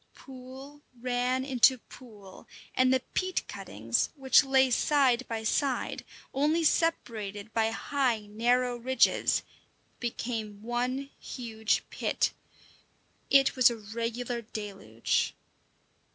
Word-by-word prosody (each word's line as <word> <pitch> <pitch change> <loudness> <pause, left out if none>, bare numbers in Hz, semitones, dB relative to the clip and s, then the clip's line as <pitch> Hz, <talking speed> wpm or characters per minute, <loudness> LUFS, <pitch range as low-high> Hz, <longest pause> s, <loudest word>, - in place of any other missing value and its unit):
Pool 265 +2 -11 0.2
ran 250 +1 0
into 260 -1 +5
pool, 210 -6 -14 0.3
and 255 0 +3
the 260 -1 +3
peat 370 0 -1
cuttings, - - -2
which 265 -1 +5
lay 265 -1 +3
side 260 -1 +3
by 225 -1 -4
side, 265 +4 -1 0.3
only 305 +5 +2
separated 220 -11 0
by 225 -1 +2
high, 250 -1 0
narrow 240 +4 +1
ridges, 260 +2 +2 0.6
became 225 -3 -4
one 250 +4 -2
huge 220 -3 -2
pit. - - 0 1.0
It 275 -1 +5
was 255 -1 +6
a 235 - -4
regular 230 +3 -4
deluge. 200 - -2
245 Hz, 105 wpm, -29 LUFS, 225-265 Hz, 1.0 s, was